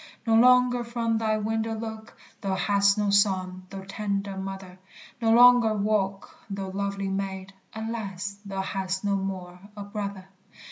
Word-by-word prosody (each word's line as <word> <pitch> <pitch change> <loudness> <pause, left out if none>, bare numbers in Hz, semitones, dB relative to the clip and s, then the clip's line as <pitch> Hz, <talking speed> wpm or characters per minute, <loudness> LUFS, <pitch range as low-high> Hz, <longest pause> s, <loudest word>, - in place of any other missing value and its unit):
No 225 - +2
longer 250 +1 +5
from 230 -1 -1
thy 220 -1 +1
window 220 +1 -1
look, 220 0 -7 0.2
Thou 195 -3 -1
hast 200 +2 +3
no 205 -1 +1
son, 185 -2 +1
thou 195 -1 -7
tender 200 -1 -3
mother! 190 -1 -7 0.4
No 225 -1 +3
longer 240 -1 +7
walk, 200 -2 -1
thou 195 -1 -4
lovely 200 0 -2
maid; 195 0 -4 0.2
Alas, 200 -3 -4
thou 195 -1 -4
hast 190 0 -3
no 200 -1 +2
more 185 -2 -4 0.2
a 205 - -5
brother! 200 -2 -5
200 Hz, 145 wpm, -26 LUFS, 195-220 Hz, 0.4 s, longer